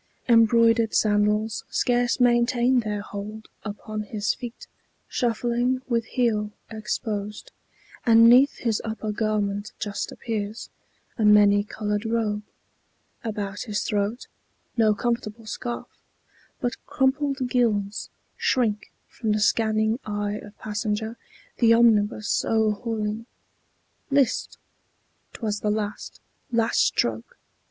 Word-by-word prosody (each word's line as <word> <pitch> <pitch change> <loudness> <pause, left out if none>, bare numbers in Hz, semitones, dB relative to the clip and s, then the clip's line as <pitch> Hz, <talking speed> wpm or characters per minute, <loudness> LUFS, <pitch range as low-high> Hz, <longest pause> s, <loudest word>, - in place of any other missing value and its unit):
Embroidered 230 -1 +4
sandals 210 +1 +2
scarce 245 +1 +1
maintain 245 +1 +3
their 210 -3 -2
hold 210 +2 -7 0.2
Upon 215 0 -5
his 210 0 -1
feet, 240 -1 -8 0.4
shuffling, 240 +2 0
with 230 -2 0
heel 220 -4 0 0.2
exposed, 210 -1 -4 0.5
And 230 -1 +7
'neath 255 +4 +6
his 225 -3 -1
upper 220 -1 -3
garment 210 -1 -1
just 205 -1 -4
appears 215 -1 -5 0.5
A - - +2
many 205 -1 +6
colored 210 0 -3
robe; 225 -2 -1 0.8
about 205 -2 -4
his 205 - -1
throat 210 +4 -1 0.5
No 220 -2 +3
comfortable 230 -1 -2
scarf, 240 +3 -4 0.7
but 245 - -3
crumpled 270 0 +1
gills 215 -5 0 0.3
Shrink 220 -5 0 0.2
from 220 -3 -2
the 215 - 0
scanning 220 +1 +2
eye 205 0 -3
of 205 0 -13
passenger 215 +1 -3 0.4
The 230 -1 +5
omnibus 215 -2 +3
o'erhauling. 220 0 -1 0.8
List! 275 -3 +1 0.8
't - - -12
was 210 -1 -1
the 210 - -1
last, 210 0 -3 0.3
Last 230 -1 +2
stroke! 115 -1 0
220 Hz, 110 wpm, -25 LUFS, 210-235 Hz, 0.8 s, And